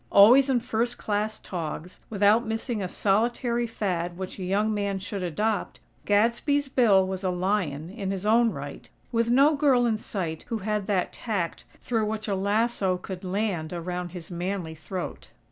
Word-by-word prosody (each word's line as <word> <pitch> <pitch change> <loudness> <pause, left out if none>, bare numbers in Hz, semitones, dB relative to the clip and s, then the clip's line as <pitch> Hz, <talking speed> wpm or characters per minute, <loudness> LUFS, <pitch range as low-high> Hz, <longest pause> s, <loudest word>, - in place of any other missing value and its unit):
Always 250 +7 +7
in 250 -3 +2
first 235 +1 -1
class 215 +1 -1
togs, 170 0 -6
without 210 +2 +4
missing 225 0 -3
a 185 - -1
solitary 235 +5 +1
fad 175 -6 -2
which 190 +1 -6
a - - -4
young 205 +4 +1
man 200 -1 -1
should 195 +1 -5
adopt, 205 +5 -1 0.3
Gadsby's 235 +7 +2
Bill 210 -8 +4
was 190 0 -4
a 185 - +1
lion, 180 -4 -1
in 200 -2 -4
his 195 0 -3
own 230 +2 +5
right, - - -7 0.2
with 230 -1 +1
no 280 +5 +5
girl 275 -4 +4
in 220 -2 +1
sight 170 -7 -4
who 230 - -2
had 210 -2 -1
that 195 -4 0
tact 200 -8 -3 0.2
through 225 -3 0
which 215 0 -3
a 205 - 0
lasso 200 -1 +1
could 185 0 -7
land 185 -4 -2
around 175 +1 -4
his 175 -1 -8
manly 175 -1 -3
throat. 160 - -6
205 Hz, 170 wpm, -26 LUFS, 180-225 Hz, 0.3 s, Always